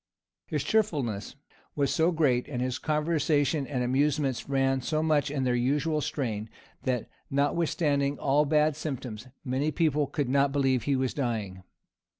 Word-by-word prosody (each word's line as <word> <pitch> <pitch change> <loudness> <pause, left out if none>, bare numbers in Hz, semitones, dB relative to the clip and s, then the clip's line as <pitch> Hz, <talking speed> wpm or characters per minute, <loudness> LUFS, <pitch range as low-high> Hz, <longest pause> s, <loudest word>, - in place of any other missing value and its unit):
His - - -1
cheerfulness 145 - 0 0.4
was 140 -2 +1
so 165 +2 +3
great, 140 -7 +2
and 135 -5 -4
his 125 0 -1
conversation 150 -2 +1
and 125 -4 -1
amusements 135 0 0
ran 135 -1 +2
so 155 +4 -1
much 150 -2 +2
in 140 -2 -1
their 125 -1 +1
usual 145 +5 +1
strain, 110 -8 -3 0.4
that, 125 -3 0 0.2
notwithstanding 145 -1 +1
all 145 +2 +2
bad 150 0 +3
symptoms, 130 -6 -5 0.2
many 135 +4 0
people 150 -2 +1
could 145 0 -2
not 140 +2 +3
believe 135 -4 +1
he 140 - +2
was 130 -1 0
dying. 110 -9 -3
140 Hz, 150 wpm, -28 LUFS, 130-150 Hz, 0.4 s, so